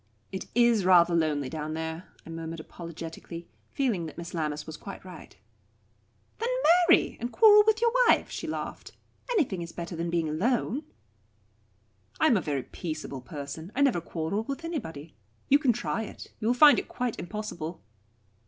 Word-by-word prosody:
"It 190 - -5
is 235 -4 +4
rather 175 -2 +6
lonely 155 -4 +1
down 155 +2 -4
there," 160 +2 -4 0.2
I 165 - -9
murmured 165 0 -6
apologetically, 165 +1 -8 0.2
feeling 220 -12 -1
that 155 - -11
Miss 170 0 -7
Lammas 150 -3 -2
was 160 - -7
quite 195 +1 -9
right. 185 - -11 1.0
"Then 465 - -1 0.4
marry, 350 - +4
and 240 +2 -3
quarrel 420 -2 +7
with 440 0 +3
your 470 0 +4 0.2
wife," - - +3
she - - -5
laughed. - - -5 0.4
"Anything 290 - +1
is 170 0 -6
better 170 0 -6
than 170 +1 -2
being 165 -1 0
alone." 240 - 0 1.3
"I - - +4
am 265 - +5
a 190 - +2
very 140 -5 -2
peaceable 155 -5 -6
person. 150 +4 -7
I 280 - +1
never 260 -11 +3
quarrel 165 +5 -2
with 275 +7 -5
anybody. 165 - -5 0.4
You 280 - +6
can 270 -4 +3
try 225 0 -2
it. 220 - -9
You 220 - -2
will 245 - +3
find 290 +3 +8
it - - -6
quite 245 -2 -3
impossible." 175 -4 -5
175 Hz, 170 wpm, -28 LUFS, 160-240 Hz, 1.3 s, find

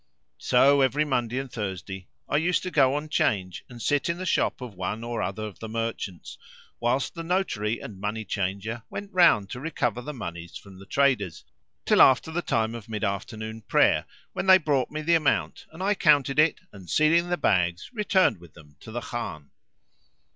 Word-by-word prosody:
So, 140 - +4
every 140 +3 +2
Monday 125 -3 -1
and 135 -1 -4
Thursday 95 -3 -5 0.2
I - - +1
used 170 +3 +1
to 185 - -4
go 135 -3 +4
on 150 +1 -3
'Change 95 - 0
and 120 -1 -11
sit 145 +6 0
in 170 - -1
the 185 - -5
shop 170 - +1
of 125 -4 -8
one 95 +4 -4
or 120 -1 -3
other 110 - -3
of 105 -3 -7
the 110 - -7
merchants, 115 -5 -5 0.4
whilst 125 +3 0
the 165 - -6
notary 165 - -1
and 100 -4 -9
money 105 +2 -3
changer 100 +4 -3
went 200 0 -7
round 165 - +4
to 125 - -5
recover 125 -5 -2
the 150 - -6
monies 85 - -7
from 95 -2 -14
the 95 - -13
traders, 125 - +1 0.4
till - - +5
after 130 +4 +5
the 175 +2 -1
time 115 -7 0
of 115 -2 -9
mid 105 -2 -4
afternoon 110 +3 -4
prayer, - - +3 0.3
when - - -3
they 190 0 +9
brought 145 -7 0
me 155 +1 -5
the 170 +2 +2
amount, 160 -3 +1
and 165 +4 -7
I 205 +2 +3
counted 145 -6 +3
it 155 +1 +3
and, 95 -4 -12
sealing 165 - +3
the 175 - 0
bags, 90 - 0
returned 190 - +2
with 85 -2 -16
them 75 -3 -17
to 110 - -11
the 120 +2 -4
Khan. 80 -14 -6
120 Hz, 195 wpm, -26 LUFS, 100-150 Hz, 0.4 s, they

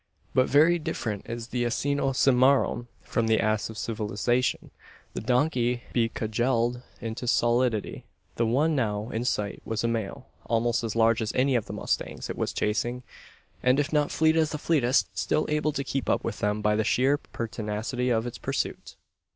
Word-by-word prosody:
But 130 - +3
very 160 +5 +5
different 110 -9 -4
is 115 0 -5
the 120 0 -1
"asino 135 +3 0
cimmaron" 130 -1 +3 0.2
from 115 -1 -1
the 110 0 +3
ass 110 0 0
of 110 - -9
civilisation 110 +4 -1 0.4
the - - -4
donkey 125 -1 +1
be 115 -2 +2
cudgelled 120 +2 0 0.2
into 115 +1 -5
stolidity. 120 -2 +1 0.3
The 115 - +1
one 150 +7 +2
now 110 -3 -1
in 115 +2 -2
sight 105 -5 -1
was 110 -1 -3
a - - +2
male, 115 -4 -3 0.2
almost 115 +1 +1
as 115 -2 -3
large 115 0 +3
as 110 0 -1
any 135 +1 +3
of 120 -4 0
the - - -6
mustangs - - -3
it - - -5
was - - -2
chasing; 120 +4 -1 0.6
and 125 +2 +3
if 145 +1 -1
not 150 -1 +2
fleet 160 0 +3
as 160 -2 +3
the 155 - -3
fleetest, 140 -5 +1
still 155 - 0
able 150 0 +1
to 140 -1 -3
keep 135 0 -3
up - - +1
with - - -4
them 105 +1 -1
by 105 0 +3
the 110 - +1
sheer 135 +6 +2
pertinacity 115 +2 -3
of 115 -1 +1
its 120 - -6
pursuit! - - -3
120 Hz, 180 wpm, -27 LUFS, 110-135 Hz, 0.6 s, very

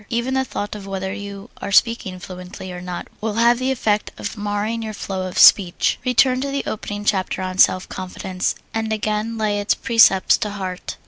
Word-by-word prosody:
Even 235 +3 -1
the 265 0 +2
thought 205 -5 -5
of 205 -2 -8
whether 190 0 -3
you 200 +1 -8
are - - -4
speaking 205 -4 +2
fluently 185 0 -9
or 180 0 -7
not 180 -1 -6
will 215 -1 -2
have 235 +1 +4
the 255 +1 0
effect 215 -5 0
of 205 - -5
marring 210 +2 -2
your 215 -1 -5
flow 190 -2 -4
of 185 - -7
speech. 185 -3 +5
Return 255 +1 +3
to 280 - -2
the 275 0 -2
opening 205 -1 -5
chapter, 190 -2 0
on 185 0 -4
self 185 -1 +4
confidence, 185 0 -3 0.2
and 225 0 -2
again 215 +1 -1
lay 210 -2 0
its 205 - +1
precepts 225 -5 +4
to 210 - -2
heart. 190 -3 -5
205 Hz, 195 wpm, -21 LUFS, 190-230 Hz, 0.2 s, speech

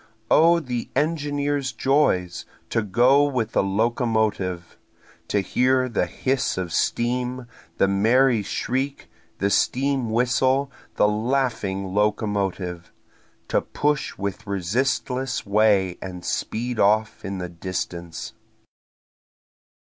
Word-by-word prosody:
O 170 +2 +6
the 125 -6 -4
engineer's 145 -2 0
joys! 125 - +1 0.3
to 115 - +2
go 120 +7 +4
with 125 -6 -1
a - - +4
locomotive! 105 -4 0 0.5
To 100 - +1
hear 130 +5 +2
the 105 -7 0
hiss 130 +6 -1
of 90 -3 -3
steam, 125 +1 -1 0.3
the 95 - +3
merry 115 +5 +3
shriek, 130 +7 -3 0.3
the 100 +1 0
steam 135 0 +1
whistle, 130 +4 +2 0.2
the - - +4
laughing 105 -4 -1
locomotive! 100 -4 -1 0.6
To - - +2
push 150 -1 -1
with 100 +1 -4
resistless 125 +6 -1
way 100 -3 +2
and 90 -2 -7
speed 120 +1 -2
off 105 +2 +2
in 95 0 -4
the 90 -1 -5
distance. 85 -1 -5
115 Hz, 105 wpm, -23 LUFS, 95-130 Hz, 0.6 s, O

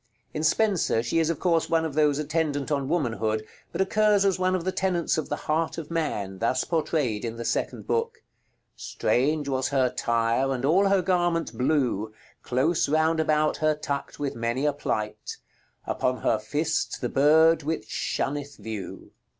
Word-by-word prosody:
In 155 - -3
Spenser 175 - +2
she 125 +7 0
is 160 -1 +1
of 165 - -2
course 170 -3 +1
one 165 -1 +2
of 155 - -4
those 150 -1 +3
attendant 150 -1 -1
on 140 -2 0
Womanhood, 115 - -1 0.3
but - - -2
occurs 205 0 +3
as 190 -1 +2
one 185 0 +2
of 180 - -2
the 185 - -1
tenants 180 -3 0
of 155 - -3
the - - 0
Heart 160 +2 0
of 165 0 -7
Man, 105 - -2
thus 125 +3 +1
portrayed 150 -9 -1
in 115 -1 -4
the 115 0 -6
second - - -2
book: 460 0 -2 0.5
"Straunge 145 +3 0
was 130 -1 0
her 135 -2 +2
tyre, 115 +3 +1
and 130 0 -2
all 185 +7 +4
her 195 -2 +3
garment 175 -2 0
blew, 125 -6 0 0.3
Close 145 +7 +1
rownd 160 +2 +2
about 155 -1 +2
her 155 -1 +2
tuckt 145 -2 -4
with 145 -2 -2
many 120 +4 -2
a 150 - +2
plight: 105 -6 -4 0.5
Upon 125 0 -1
her 110 - +2
fist 150 +9 -1
the 125 - 0
bird 160 +5 +4
which 150 -7 -3
shonneth 145 +4 -3
vew. 105 -2 -7
150 Hz, 175 wpm, -26 LUFS, 125-165 Hz, 0.5 s, all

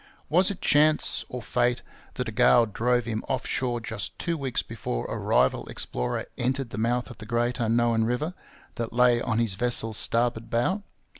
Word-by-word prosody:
Was 180 +4 +4
it 200 - -5
chance, 150 +1 +2
or 125 -2 -6
fate, 125 0 +1 0.3
that 125 - -3
a - - -3
gale 120 +1 +5
drove 120 +3 0
him 110 -2 -3
off 130 -2 -1
shore 120 -2 -1
just 110 -3 -5
two 170 -1 -2
weeks 135 -5 -2
before 100 - -4
a - - -4
rival - - +1
explorer 60 - -3
entered 130 0 -1
the 105 - -4
mouth 120 +3 0
of 120 - -13
the 110 - -8
great 120 +1 0
unknown 115 0 +2
river 125 +9 -1 0.4
that 115 -1 -3
lay 120 -1 +4
on 115 -2 -1
his 115 -4 +2
vessel's 115 0 +1
starboard 115 -1 +1
bow? 150 - +1
120 Hz, 180 wpm, -26 LUFS, 115-125 Hz, 0.4 s, gale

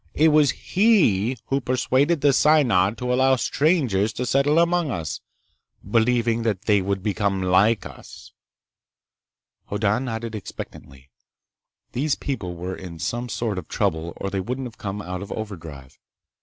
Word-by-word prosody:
It 160 +2 +5
was 150 -2 +4
he 135 - +2
who 135 +1 +1
persuaded 130 +5 +1
the 145 -1 +4
Synod 120 -10 +3
to 125 0 -1
allow 130 +1 +4
strangers 130 - +1
to 125 - -3
settle 140 +5 +2
among 170 -1 +2
us, 80 - -4 0.7
believing 115 +1 +2
that 110 -4 -1
they 105 -3 +3
would 95 0 -2
become 100 -2 0
like 100 +4 +3
us." - - -12 1.4
Hoddan 105 +4 0
nodded 115 -2 -4
expectantly. 70 -9 -9 0.8
These 140 +4 0
people 95 -11 -4
were 90 +2 -5
in 90 -3 -9
some 120 +9 -3
sort 110 -4 -2
of 80 - -11
trouble 80 +1 -1
or 100 - -5
they 95 - -1
wouldn't 125 +7 -4
have 115 -2 -10
come 100 0 -5
out 90 +1 -5
of 100 - -8
overdrive. 80 -11 -8
115 Hz, 145 wpm, -23 LUFS, 95-135 Hz, 1.4 s, It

